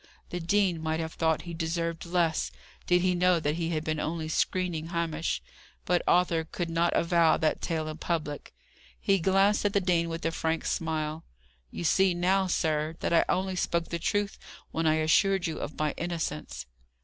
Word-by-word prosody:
The 175 - -3
dean 175 -1 +1
might 160 0 -1
have 160 -1 -4
thought 160 -1 +1
he 170 - -7
deserved 165 0 -2
less, 170 -2 +1 0.4
did 180 0 +3
he 185 -1 +3
know 180 0 +3
that 150 -1 0
he 165 -1 -1
had 155 -2 -1
been 155 -1 -2
only 160 0 -2
screening 170 -1 0
Hamish; 165 -2 -2 0.4
but 175 0 +2
Arthur 175 -2 +3
could 170 +1 -4
not 170 +1 +1
avow 170 -1 +4
that 155 - 0
tale 160 -2 -2
in 155 0 -5
public. 155 -4 -3 0.5
He 195 -1 +2
glanced 195 +4 +3
at 205 -1 +1
the 200 - +4
dean 175 -3 +1
with 165 0 -5
a 165 - +1
frank 160 0 -1
smile. 155 -1 -2 0.5
"You - - -6
see 185 +2 +3
now, 190 +2 +2
sir, 155 -2 0
that - - 0
I 170 - +5
only 190 0 0
spoke 170 -1 -1
the 170 - -3
truth 205 +4 -1 0.3
when 165 0 0
I 155 - +4
assured 180 +4 +3
you 160 -2 -3
of 150 - -6
my 155 -1 0
innocence." 120 - -4
165 Hz, 185 wpm, -28 LUFS, 160-180 Hz, 0.5 s, I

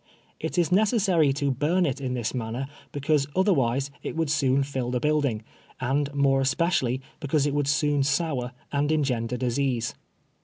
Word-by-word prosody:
It - - -4
is 175 0 +2
ne 190 +3 +5
cessary 195 - +3
to 140 -1 0
burn 160 +8 +1
it 140 -2 -2
in 125 -1 -2
tliis 120 -3 -2
manner, 120 +1 -3 0.3
because 145 0 +1
otherwise 140 - +2
it - - -5
would 160 -3 0
soon 140 -2 +2
lill 125 -2 -1
the 125 0 0
building, 145 -6 0 0.4
and 140 +3 0
more 135 -1 +3
especially 135 -3 +1 0.2
because 145 -1 +1
it 145 - 0
would 145 -1 0
soon 145 0 +2
sour 135 -3 0 0.2
and 145 +1 +1
engender 125 -6 0
disease. 125 -1 -1
140 Hz, 165 wpm, -26 LUFS, 130-155 Hz, 0.4 s, ne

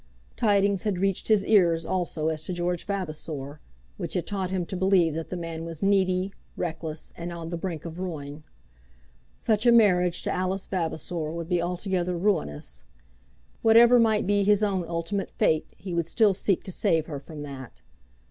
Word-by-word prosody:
Tidings 200 -4 +2
had 205 -4 -1
reached 195 0 0
his 210 -3 +4
ears 170 -6 +4
also 170 -4 -1
as 155 -1 -2
to 185 - -2
George 175 +1 -2
Vavasor, 155 -7 -4 0.4
which - - -4
had - - -1
taught 195 -3 -3
him 185 -2 -1
to 190 - -6
believe 185 -3 +3
that 165 +1 -5
the 180 - -4
man 165 -1 -5
was 165 0 -6
needy, 190 -1 +2 0.2
reckless, 160 -2 -4
and 170 +1 -6
on 165 -1 -6
the 170 - -3
brink 170 -2 -5
of 165 +1 -7
ruin. 150 -5 -6 0.9
Such 220 +1 +1
a - - +8
marriage 180 -6 +4
to - - -1
Alice 185 +1 -1
Vavasor 165 -2 -3
would 165 0 -5
be 175 -2 +2
altogether 180 0 -1
ruinous. 170 - -1 0.8
Whatever 235 +2 +7
might 220 -2 +3
be 205 +1 +2
his 205 +1 +3
own 190 -4 0
ultimate 170 +4 -2
fate 155 -1 +1
he 185 -3 -6
would 170 -1 0
still 210 +2 +3
seek 195 -1 0
to 190 - -5
save 160 -2 +1
her 145 -3 -6
from 150 +1 -9
that. 135 -3 -9
180 Hz, 175 wpm, -26 LUFS, 165-195 Hz, 0.9 s, a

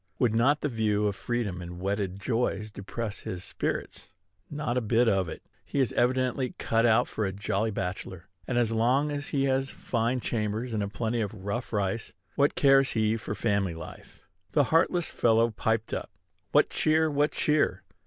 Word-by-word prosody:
Would 120 -3 +2
not 135 +6 +3
the - - 0
view 110 -4 0
of 100 -1 0
freedom 100 -3 -2
and 85 0 -8
wedded 100 0 -2
joys 110 -2 -1
depress 105 +1 -5
his 90 0 -5
spirits? - - -3 0.4
Not 145 -5 -2
a 125 - +2
bit 115 +2 +2
of 95 -5 +2
it. - - -8 0.2
He 140 - -3
is 130 -5 +1
evidently 130 +1 +1
cut 115 +1 +2
out 110 -1 +4
for 110 - -3
a 95 - 0
jolly 100 +2 -1
bachelor; 95 -3 -5 0.2
and, 120 - -1
as 120 -2 +2
long 125 +6 +2
as 145 0 -3
he 135 -2 0
has 135 0 +1
fine 120 +1 -1
chambers 115 +1 -2
and 105 - 0
a 100 - -1
plenty 115 +3 -2
of 100 -2 -5
rough 120 +5 -3
rice, 105 0 -2 0.2
what 140 +1 +2
cares 135 -1 +4
he 110 -1 +2
for 105 -1 -4
family 100 -4 0
life? 80 - -11 0.3
The 145 - +5
heartless 170 +1 +3
fellow 115 0 +3
piped 110 +1 -1
up, - - -3 0.4
"What - - +4
cheer! 155 0 +2
what 145 +1 +1
cheer!" 150 -1 +1
115 Hz, 185 wpm, -28 LUFS, 100-130 Hz, 0.4 s, The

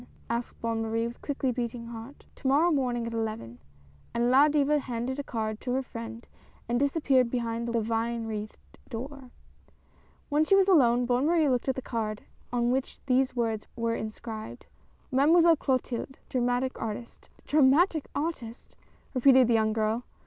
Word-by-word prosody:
" - - -29
asked 235 +1 -3
Bonne 230 -1 -1
Marie 225 +1 -1
with 235 0 -7
quickly 275 -2 -1
beating 235 -1 -4
heart. 230 +4 -10
" - - -33
To 270 - -4
morrow 305 +6 +4
morning 250 -5 0
at 230 - -5
eleven! 215 - -4 0.3
" 70 0 -29
and 240 +1 +2
La 275 +3 +7
Diva 295 0 +2
handed 255 +1 -4
a - - -2
card 220 -4 -3
to 250 - -2
her 265 +1 0
friend 230 -1 -8 0.4
and 240 +1 0
disappeared 275 -3 +2
behind 235 -1 -2
the 235 0 0
vine 230 +1 -1
wreathed 215 -1 -5 0.3
door. 265 +2 -7 1.0
When 295 +1 +2
she 390 +5 +4
was 390 -1 +4
alone, 245 -9 +4
Bonne 250 +4 +1
Marie 325 -2 +3
looked 250 +1 0
at 265 - +1
the 260 - -5
card 215 -3 -3 0.3
on 240 0 +1
^hich 265 +1 -2
these 255 0 +2
words 225 -3 -1
were 230 -1 -1
inscribed, 220 0 -6 0.5
MADEMOISELLE 325 +5 +5
CLOTILDE. 260 -1 -2
DRAMATIC 245 +1 0
ARTIST. 225 +2 -6 0.2
"Dramatic 300 +3 +3
artist?" 275 -7 -5 0.4
repeated 260 -1 +6
the 235 - +3
young 220 -1 +3
girl. 220 +2 0
245 Hz, 170 wpm, -28 LUFS, 230-270 Hz, 1.0 s, La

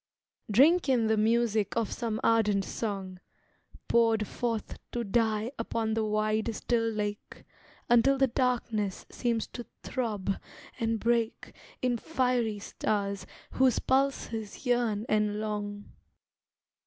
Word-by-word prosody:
Drink 290 - +5
in 245 -4 +3
the 220 0 +3
music 220 -1 +2
of 230 -2 0
some 225 -3 -2
ardent 210 -4 +3
song, 195 -4 -4 0.7
Poured 225 -2 +3
forth 230 -3 -3
to 240 - -1
die 220 +1 +1
upon 225 -1 -1
the 220 0 +1
wide, 215 +1 0
still 230 0 0
lake, 210 -1 -4 0.4
Until 240 +3 +5
the 270 - +5
darkness 235 -6 -1
seems 235 -3 -1
to 240 - -8 0.2
throb 205 -6 -2 0.4
and 225 -1 0
break 230 0 0 0.3
In 245 -1 +2
fiery 250 -7 0
stars 200 -1 -2 0.2
whose 260 -1 +3
pulses 260 -5 -1
yearn 235 -4 +1
and 210 -1 +1
long. 205 -1 -4
225 Hz, 115 wpm, -29 LUFS, 210-240 Hz, 0.7 s, Drink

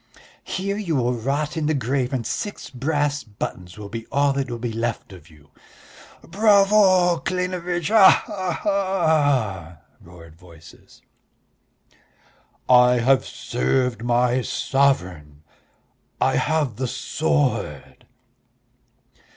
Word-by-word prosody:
"Here 200 +2 -3
you 180 -7 -2
will 125 -2 0
rot 140 +6 -2
in 155 -2 -2
the 155 - +1
grave 130 0 -1
and 125 -4 -3
six 205 - -5
brass 145 +2 -1
buttons 90 -4 -7
will 105 -1 -8
be 115 +2 -7
all 140 0 +1
that 135 -1 -3
will 120 - -4
be 115 -1 -4
left 115 -3 -4
of 85 -4 -15
you." 75 -2 -21 0.7
"Bravo, 195 -3 +3
Klinevitch, 180 -2 -3
ha 215 -3 +6
ha 190 -5 -4
ha!" 145 - 0 0.2
roared 85 -2 -15
voices. 85 -2 -18 1.6
"I 125 -1 +6
have 130 +2 +2
served 115 - -2
my 120 +1 +1
sovereign.... 90 - -1 0.8
I - - +1
have 150 -7 -1
the 130 0 -2
sword...." 130 - -2
135 Hz, 110 wpm, -22 LUFS, 110-165 Hz, 1.6 s, ha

